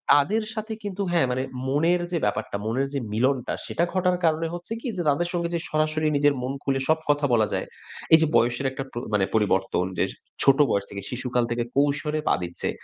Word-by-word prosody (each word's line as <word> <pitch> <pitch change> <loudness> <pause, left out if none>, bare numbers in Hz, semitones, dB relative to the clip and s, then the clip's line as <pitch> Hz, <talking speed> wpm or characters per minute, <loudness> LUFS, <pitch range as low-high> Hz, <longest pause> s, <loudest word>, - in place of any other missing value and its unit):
তাদের 200 +10 +2
সাথে 220 0 -4
কিন্তু 200 -1 -4
হ্যাঁ, 170 -6 +3
মানে 130 +1 -1 0.2
মনের 165 +6 +2
যে 175 - +1
ব্যাপারটা, 100 0 -2
মনের 130 +5 0
যে 140 - 0
মিলনটা 125 +3 +1
সেটা 170 - -1
ঘটার 180 -1 +2
কারণে 160 0 +2
হচ্ছে 175 +5 -5
কি? - - -5
যে, - - 0
তাদের 145 +5 +1
সঙ্গে 170 -1 -1
যে - - 0
সরাসরি 155 0 +1
নিজের 145 0 +4
মন 130 +2 -2
খুলে 135 -1 0
সব 160 0 +4
কথা 145 0 +3
বলা 110 -2 +4
যায়। - - -1 0.5
এই - - +11
যে 160 - +3
বয়সের 120 +3 +2
একটা 135 +1 -4
কো - - -9 0.2
মানে 100 -2 +3
পরিবর্তন 95 -4 +1
যে, - - +4 0.4
ছোট 135 -1 +6
বয়স 100 0 0
থেকে 100 - -6
শিশুকাল 125 -1 -1
থেকে 120 0 0
কৈশোরে 145 +2 +1
পা - - +4
দিচ্ছে। 85 0 -3
140 Hz, 205 wpm, -25 LUFS, 125-165 Hz, 0.5 s, এই